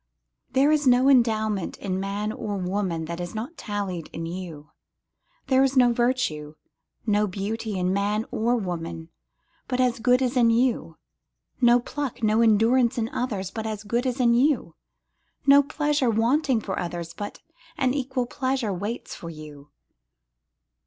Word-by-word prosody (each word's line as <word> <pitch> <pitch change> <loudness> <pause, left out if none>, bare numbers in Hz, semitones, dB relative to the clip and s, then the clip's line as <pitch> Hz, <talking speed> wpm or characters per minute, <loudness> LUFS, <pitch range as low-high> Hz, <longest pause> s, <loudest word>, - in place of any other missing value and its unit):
There 275 +3 +4
is 300 -2 +2
no 255 +2 +5
endowment 220 -6 +2
in 185 -1 -3
man 200 +2 -2
or 205 -2 -4
woman 180 -3 -2
that 170 +1 -5
is 175 +3 -5
not 240 +10 -5
tallied 200 - -4
in 165 - -5
you, 165 -4 -7 0.7
There 265 0 +4
is 270 0 +1
no 245 -2 +5
virtue, 235 - -1 0.5
no 210 -1 +2
beauty 205 +2 -4
in 180 0 0
man 205 +3 0
or 235 +3 +1
woman, 170 -5 -4 0.6
but 250 -1 -2
as 250 -2 +2
good 250 +2 +3
is 255 +1 -1
in 240 -2 +4
you, 240 +1 +1 0.6
No 240 0 +6
pluck, 270 -1 -5
no 215 +1 +3
endurance 230 +3 +3
in 225 -1 -1
others, 205 -8 -3
but 220 -1 -4
as 215 -1 -5
good 235 +5 -1
is 250 +1 -2
in 240 -2 +4
you, 245 - +2 0.7
No 280 0 +8
pleasure 295 -2 0
waiting 240 +3 +2
for 190 -2 -4
others, 170 -1 -5
but 205 +3 -7 0.4
an 255 -1 +1
equal 265 -2 -1
pleasure 255 -3 -2
waits 205 +6 -5
for 170 - -8
you. 150 -3 -11
220 Hz, 155 wpm, -25 LUFS, 190-250 Hz, 0.7 s, No